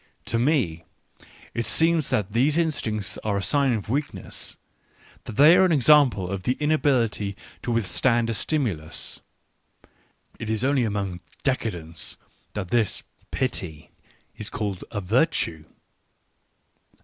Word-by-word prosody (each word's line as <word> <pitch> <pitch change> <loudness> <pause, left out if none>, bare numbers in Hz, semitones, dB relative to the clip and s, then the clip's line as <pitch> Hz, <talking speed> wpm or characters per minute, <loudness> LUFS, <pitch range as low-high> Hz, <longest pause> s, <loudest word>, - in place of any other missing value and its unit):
To 115 - 0
me 120 - +1 0.7
it 115 -2 -1
seems 160 +3 +2
that 105 -1 0
these 135 +8 +2
instincts 110 - -1
are 105 -2 -1
a 100 - -2
sign 140 +1 +2
of 105 -4 -3
weakness, 145 +6 -4 0.7
they 150 +9 +6
are 190 - +6
an 185 - +4
example 140 - +5
of 95 +1 -3
the 125 - +1
inability 130 -10 +1 0.2
to 120 - -3
withstand 115 +2 +2
a 115 - -1
stimulus 105 - -2 0.6
— - - -33
it 115 - -5
is 110 +1 0
only 135 -2 +3
among 100 -4 -2 0.2
decadents 90 - -2 0.4
that 100 -4 -4
this 115 -4 +1 0.3
pity 90 - -3 0.4
is 105 - -4
called 105 -6 -3
a 105 - -3
virtue. 100 - +1
115 Hz, 125 wpm, -25 LUFS, 100-140 Hz, 0.7 s, they